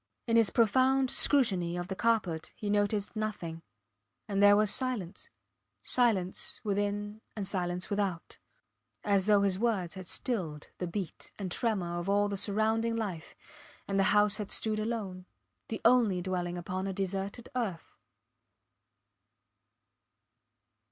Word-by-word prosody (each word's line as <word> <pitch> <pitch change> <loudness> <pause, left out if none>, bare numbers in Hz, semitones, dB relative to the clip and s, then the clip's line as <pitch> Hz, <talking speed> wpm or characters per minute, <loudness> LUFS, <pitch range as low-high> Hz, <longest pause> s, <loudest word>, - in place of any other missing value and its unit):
In 230 - +1
his 230 -3 +5
profound 260 +3 +3
scrutiny 190 -11 +3
of 175 0 -4
the 190 - -4
carpet 200 -8 0
he 205 -1 -3
noticed 205 +1 0
nothing. 205 -7 -4 0.7
And 200 -2 0
there 205 0 +7
was 210 0 +6
silence, 245 -9 -2 0.5
silence 240 - +1
within 205 +1 -2
and 205 -3 -3
silence 180 -1 -2
without, 200 -4 -2 0.6
as 200 -1 +2
though 205 -1 +5
his 195 -1 +1
words 205 -7 0
had 185 -2 -9
stilled 170 - -3
the 180 - -2
beat 175 0 -5
and 190 -3 -5
tremor 180 -6 -1
of 175 +3 -4
all 205 +1 +2
the 200 - -2
surrounding 220 +3 +1
life, 195 -8 -4 0.5
and 195 0 0
the 195 - +4
house 210 0 +4
had 210 -3 -5
stood 215 -1 0
alone 205 -5 -4 0.4
the 220 - -4
only 230 -6 +4
dwelling 180 -1 -3
upon 185 +2 -4
a 195 - -3
deserted 195 +4 -4
earth. 205 -10 -3
205 Hz, 135 wpm, -30 LUFS, 185-220 Hz, 0.7 s, there